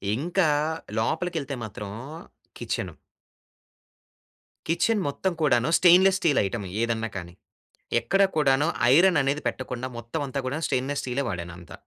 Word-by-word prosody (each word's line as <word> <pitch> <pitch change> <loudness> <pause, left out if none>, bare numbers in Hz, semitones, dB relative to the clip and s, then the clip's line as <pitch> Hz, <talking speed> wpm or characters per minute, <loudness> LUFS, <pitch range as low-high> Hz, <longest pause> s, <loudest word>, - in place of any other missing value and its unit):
ఇంకా 170 +5 +1 0.5
లోపలి 165 +10 -1
కెళ్తే 140 -3 -3
మాత్రం 105 -1 -7 0.7
కిచెను. - - -4 1.7
కిచెన్ 205 +6 +1
మొత్తం 180 +6 -1
కూడాను 125 -2 +3
స్టెయిన్లెస్ 185 +2 +6
స్టీల్ 155 -7 +2
ఐటెమ్ 100 0 -4 0.2
ఏదన్నా 115 -1 -1
కానీ. 85 -1 -8 0.7
ఎక్కడ 195 - +2
కూడాను 145 0 +3 0.3
ఐరన్ 175 0 +5
అనేది 140 +2 -1
పెట్టకుండా 130 -1 -3
మొత్తం 120 +7 -5
అంతా 140 +1 -3
కూడా 130 +4 -2
స్టెయిన్‌‌నెస్ 135 +3 -1
స్టీలే 130 +2 -2
వాడానంత. 85 -3 -7
140 Hz, 120 wpm, -25 LUFS, 115-165 Hz, 1.7 s, స్టెయిన్లెస్